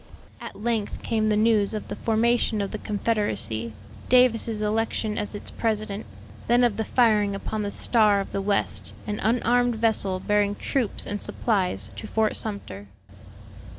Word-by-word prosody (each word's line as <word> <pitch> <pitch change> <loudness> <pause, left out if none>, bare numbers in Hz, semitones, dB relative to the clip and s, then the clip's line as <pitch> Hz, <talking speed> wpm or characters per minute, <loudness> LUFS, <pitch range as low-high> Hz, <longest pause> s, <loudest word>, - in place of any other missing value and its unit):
At - - -8
length 225 -1 -2
came 220 -1 0
the 210 - +2
news 215 -1 +2
of 215 - -5
the - - -5
formation 230 0 +1
of 200 -1 -2
the 215 - -5
Confederacy: 205 - 0 0.4
Davis's 230 -3 +4
election 215 0 -1
as 210 0 -3
its 205 - -7
president; 215 -2 -2 0.4
then 240 +1 +4
of 235 -4 +2
the 220 - 0
firing 210 -4 +2
upon 215 +2 -4
the 205 - -2
Star 210 -1 +3
of 195 - -5
the 195 - -2
West, 200 0 -1
an 210 0 -3
unarmed 245 +1 +2
vessel 215 -4 +1
bearing 205 +1 +1
troops 250 -2 -2
and 205 0 -4
supplies 180 - -1
to 100 - -6
Fort 220 -1 0
Sumter. 100 - -5
215 Hz, 155 wpm, -25 LUFS, 205-230 Hz, 0.4 s, Davis's